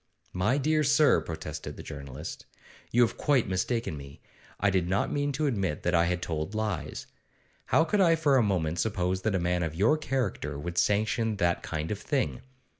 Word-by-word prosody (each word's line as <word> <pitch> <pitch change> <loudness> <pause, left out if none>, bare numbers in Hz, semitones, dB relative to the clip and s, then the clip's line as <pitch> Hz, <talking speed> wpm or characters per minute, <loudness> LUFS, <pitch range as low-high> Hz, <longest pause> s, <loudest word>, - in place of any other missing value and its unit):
'My 105 +9 +1
dear 155 +2 +2
sir,' 145 +1 +4
protested 80 -1 -6
the - - -8
journalist, 75 0 -8 0.4
'you 120 +1 +4
have 115 - -1
quite 135 -6 +2
mistaken 95 +1 -1
me. 70 0 -11 0.4
I 100 0 +3
did 90 -2 +1
not 95 +2 +1
mean 145 0 0
to 150 +3 -1
admit 100 - -1
that 90 - +1
I 85 0 +4
had 90 0 -1
told 80 +5 -3
lies. 110 -6 -3 0.6
How 160 - +4
could 195 +5 +1
I 165 -3 +5
for 150 -4 +2
a - - +5
moment 85 -6 0
suppose 95 -1 0
that 110 0 0
a - - +1
man 90 0 0
of 80 -2 -2
your 115 - +3
character 120 - -2
would 85 +4 -2
sanction 110 +4 +1
that 85 -3 +1
kind 80 +2 -4
of 105 - -3
thing? 135 +1 -1
100 Hz, 190 wpm, -28 LUFS, 85-130 Hz, 0.6 s, I